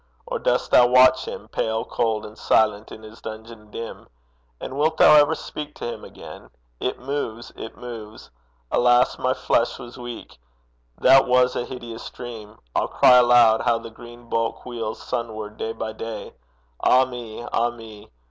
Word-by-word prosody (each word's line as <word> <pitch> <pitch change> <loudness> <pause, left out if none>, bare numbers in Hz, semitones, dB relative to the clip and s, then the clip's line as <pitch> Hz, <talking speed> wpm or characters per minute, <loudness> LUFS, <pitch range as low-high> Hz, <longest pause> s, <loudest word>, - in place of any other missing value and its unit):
or - - -4
dost - - 0
thou 125 - +7
watch 130 +1 +5
him 105 - -8
Pale, 110 0 -2
cold, 110 -2 -1
and 105 - -11
silent 110 -1 +1
in 110 - -10
his 110 +1 -13
dungeon 110 0 -10
dim? 115 +2 -8 0.5
And 130 - -7
wilt 155 +3 +1
thou - - +7
ever 150 +1 +5
speak 150 -1 -8
to 120 - -5
him - - -11
again? - - -12 0.3
'It - - -2
moves, 125 -4 -5
it 110 - -9
moves! 110 -3 -10 0.4
Alas, 120 0 +3
my 130 0 0
flesh 115 - 0
was 120 -2 -11
weak; 120 - -9 0.6
That 135 +1 +6
was 125 0 +3
a 120 - -2
hideous 120 -3 -8
dream! 110 -3 -10 0.2
I'll - - +1
cry 125 - +6
aloud 120 -2 +5
How 115 - +2
the 115 0 -9
green 120 +1 -13
bulk 115 0 -2
wheels 115 -3 -5
sunward 110 -2 -5
day 110 - -3
by 110 -1 -5
day! 110 -1 -7 0.5
Ah 130 +1 +5
me! 120 -2 -8
ah 120 +1 +2
me! 115 -3 -12
120 Hz, 165 wpm, -23 LUFS, 110-125 Hz, 0.6 s, thou